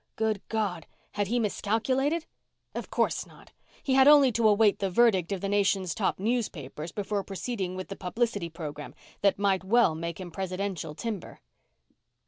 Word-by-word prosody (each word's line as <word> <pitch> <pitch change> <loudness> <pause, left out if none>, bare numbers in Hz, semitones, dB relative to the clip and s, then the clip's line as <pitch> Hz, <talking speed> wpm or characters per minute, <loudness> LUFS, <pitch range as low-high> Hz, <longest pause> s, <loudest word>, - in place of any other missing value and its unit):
Good 220 -2 0
God! 200 -7 -2 0.2
Had 205 -1 -1
he 240 +5 0
miscalculated? 255 +8 0 0.5
Of - - -5
course - - 0
not. - - -17 0.3
He 270 - 0
had 265 +1 +6
only 290 -3 +7
to 230 0 +3
await 210 0 +4
the 195 - 0
verdict 190 -3 +3
of 195 -2 -2
the 200 - -1
nation's 195 -2 +1
top 205 - 0
newspapers 180 - -3
before 205 0 -2
proceeding 195 -2 -4
with 185 +1 -6
the 195 - -5
publicity 205 -1 -2
program 150 -3 -7 0.3
that 200 -1 +3
might 195 -2 +1
well 220 -2 +4
make 165 +2 -5
him 180 -2 -7
presidential 185 -3 -4
timber. 215 0 -5
200 Hz, 160 wpm, -28 LUFS, 185-225 Hz, 0.5 s, only